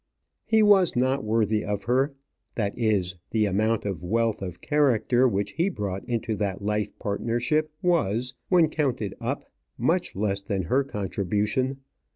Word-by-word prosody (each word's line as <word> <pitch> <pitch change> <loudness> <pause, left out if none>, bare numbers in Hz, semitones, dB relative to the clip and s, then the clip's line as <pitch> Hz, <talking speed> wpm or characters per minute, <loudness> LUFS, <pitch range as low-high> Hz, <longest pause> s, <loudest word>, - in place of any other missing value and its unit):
He 220 -1 +4
was 195 -7 +5
not 130 +1 +1
worthy 110 -1 +1
of 100 -1 -3
her. 130 +6 +1 0.4
That 100 -3 -1
is, 100 -6 0
the 110 -1 +2
amount 105 +3 +1
of 95 -6 -3
wealth 115 +4 0
of 90 -3 -6
character 130 -4 +3
which 100 -3 -1
he 170 +4 +1
brought 100 - -4
into 115 -2 -2
that 100 -1 -2
life 105 0 0
partnership 120 +9 0
was, 125 - +1 0.2
when 175 -4 +5
counted 130 - -1
up, - - -3 0.3
much - - 0
less 100 0 -1
than 100 -1 -2
her 130 +12 +2
contribution. 105 +5 -1
110 Hz, 150 wpm, -26 LUFS, 100-130 Hz, 0.4 s, was